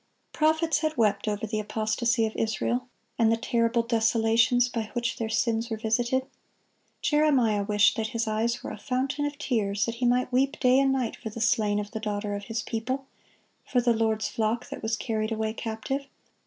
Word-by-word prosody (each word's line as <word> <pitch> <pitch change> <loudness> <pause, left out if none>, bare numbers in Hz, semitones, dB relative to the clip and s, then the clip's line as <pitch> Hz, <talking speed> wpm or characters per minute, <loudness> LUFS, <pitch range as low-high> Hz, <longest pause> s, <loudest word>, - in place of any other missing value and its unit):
Prophets 315 0 +2
had 310 -1 -1
wept 210 -2 +2
over 210 +1 -1
the 215 0 -2
apostasy 225 +2 0
of 220 - -4
Israel, 235 +3 -1 0.3
and 225 -1 +4
the 230 - +2
terrible 230 0 +1
desolations 230 +1 +3
by 225 -3 -4
which 240 -1 -1
their 225 -1 -2
sins 230 0 0
were 220 - -2
visited. 240 +4 0 0.8
Jeremiah 270 -9 +3
wished 205 +1 +3
that 220 -1 -1
his 230 0 -2
eyes 230 +3 -1
were - - -5
a - - -8
fountain 265 +2 -1
of 290 0 -6
tears, 210 -8 0
that 230 - -3
he 245 - +3
might 250 +1 +2
weep 270 +3 +1
day 255 0 +5
and 275 0 +3
night 260 -4 -1
for 220 - -7
the 220 - -8
slain 215 -2 +2
of 205 0 -5
the 220 - -4
daughter 205 -1 -3
of 200 0 -5
his 225 -1 -3
people, 255 +4 -3 0.6
for 250 - +1
the 240 -1 +3
Lord's 220 -1 0
flock 225 +2 -1
that - - -7
was 220 +1 -1
carried 215 -1 -2
away 220 0 -1
captive. 235 +5 -4
230 Hz, 195 wpm, -27 LUFS, 220-250 Hz, 0.8 s, day